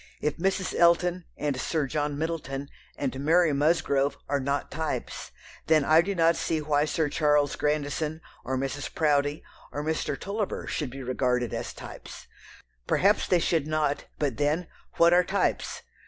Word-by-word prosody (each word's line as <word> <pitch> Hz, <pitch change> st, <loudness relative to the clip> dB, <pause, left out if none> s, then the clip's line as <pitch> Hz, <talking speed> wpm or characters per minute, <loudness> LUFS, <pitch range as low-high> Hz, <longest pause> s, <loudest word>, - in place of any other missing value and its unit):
If 150 Hz, -, -1 dB
Mrs. 190 Hz, +1 st, 0 dB
Elton, 175 Hz, +1 st, +3 dB
and 145 Hz, -3 st, -1 dB
Sir 155 Hz, -3 st, 0 dB
John 145 Hz, +1 st, -2 dB
Middleton, 145 Hz, -4 st, -3 dB, 0.3 s
and 135 Hz, -1 st, -2 dB
Mary 165 Hz, 0 st, +4 dB
Musgrove 140 Hz, -2 st, +2 dB
are 145 Hz, -, 0 dB
not 140 Hz, +1 st, -2 dB
types, 155 Hz, -, -4 dB, 0.4 s
then 155 Hz, -3 st, +4 dB
I 160 Hz, +2 st, +6 dB
do 200 Hz, +3 st, -3 dB
not 165 Hz, -1 st, +4 dB
see 160 Hz, -, -1 dB
why 150 Hz, -1 st, +1 dB
Sir 155 Hz, 0 st, 0 dB
Charles 145 Hz, -1 st, +2 dB
Grandison, 150 Hz, +1 st, -1 dB, 0.2 s
or 130 Hz, 0 st, -2 dB
Mrs. 135 Hz, +2 st, -3 dB
Proudie, 145 Hz, -1 st, +1 dB, 0.3 s
or 145 Hz, -, -4 dB
Mr. 160 Hz, +1 st, -2 dB
Tulliver 205 Hz, +1 st, -3 dB
should 150 Hz, -, -3 dB
be 135 Hz, +2 st, -8 dB
regarded 125 Hz, -2 st, 0 dB
as -, -, -3 dB
types. -, -, -10 dB, 0.6 s
Perhaps 205 Hz, +3 st, +3 dB
they 180 Hz, -, +4 dB
should 165 Hz, -3 st, +1 dB
not, 155 Hz, -2 st, 0 dB
but 140 Hz, -6 st, -1 dB
then, 150 Hz, +4 st, +1 dB, 0.3 s
what 170 Hz, +1 st, +6 dB
are 180 Hz, +1 st, +6 dB
types? 195 Hz, +2 st, -1 dB
150 Hz, 155 wpm, -27 LUFS, 140-165 Hz, 0.6 s, I